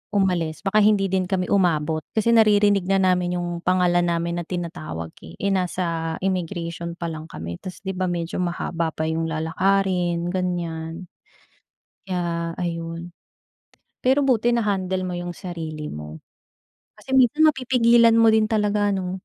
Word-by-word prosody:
umalis, 180 -5 0
baka 210 +2 +2
hindi 205 -2 +3
din 185 -1 +1
kami 185 -2 -1
umabot. 160 -5 +2 0.2
Kasi 220 +2 +2
naririnig 205 -4 +4
na 195 - +2
namin 180 -1 +2
'yong 175 -1 -3
pangalan 175 -1 +2
namin 170 0 -1
na 170 - -6
tinatawag, 85 - -5
eh. 80 - -12
Eh, 200 0 -1
nasa 170 -3 -1
immigration 170 -2 -3
pa 170 -1 -4
lang 155 0 -7
kami. 85 - -7
Tas, 185 +2 -9
'di 190 - -2
ba, 185 0 -2
medyo 170 0 -3
mahaba 170 -1 -2
pa 155 - -2
'yong 160 +1 -1
lalakarin, 175 +1 0
ganiyan, 175 -2 -3 0.9
kaya 170 -3 -2
ayun. 170 0 -4 0.9
Pero 265 +3 +3
buti 240 -2 +2
na-handle 190 -4 0
mo 180 - -3
'yong 175 -1 -5
sarili 160 -4 -6
mo. 75 +1 -7 0.8
Kasi 210 +5 -12
minsan 265 +4 +4
mapipigilan 235 -3 +4
mo 225 -1 +6
rin 220 -1 +3
talaga, 210 -1 +1
ano? 185 -1 -3
180 Hz, 145 wpm, -23 LUFS, 170-200 Hz, 0.9 s, mo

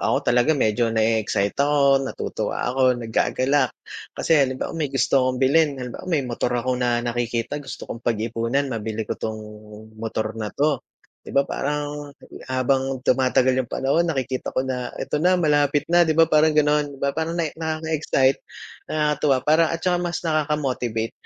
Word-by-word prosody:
ako - - 0
talaga 125 +5 +3
medyo 115 -1 +1
na-e-excite 110 -3 +1
ako, 140 -1 +4
natutuwa 135 - -3
ako, 130 -1 +3
naggagalak. 130 +3 +1 0.5
Kasi - - 0
halimbawa 130 -1 -1
may 160 -3 -2
gusto 135 0 +2
akong 130 0 0
bilhin, 140 +2 +3
halimbawa 125 +7 -7
may 155 -6 +1
motor 120 0 -2
ako 125 +1 -1
na 120 -1 +1
nakikita 120 +3 -2
gusto 135 - -8
kong 115 - -7
pag-iipunan, 115 +4 -1
mabili 110 -1 -3
ko - - -3
tong 110 0 -3 0.6
motor 110 -1 -3
na 110 -2 -4
'to. 145 +3 0 0.4
'Di - - -14
ba 140 - +5
parang, 145 +1 -3 0.4
habang 130 0 0
tumatagal 130 0 +3
yung 120 - -5
panahon, 160 +6 +1
nakikita 130 -4 -2
ko 130 - -1
na, 125 -2 -4
"Ito 150 - -2
na 180 +2 +4
malapit 145 -3 +2
na", 175 -1 +5
'di 155 - +1
ba 165 - +7
parang 155 -1 +3
ganon. 150 0 +3
'Di 140 - -11
ba 140 +1 -1
parang 160 +1 -3
nae 165 -3 -1
nakaka-excite, 160 -4 0 0.5
nakakatuwa, 150 -2 +1
parang 160 +2 +4
at - - -15
tsaka 180 -1 +2
mas 175 0 -3
nakaka-motivate. 140 -8 -1
135 Hz, 165 wpm, -23 LUFS, 120-150 Hz, 0.6 s, ba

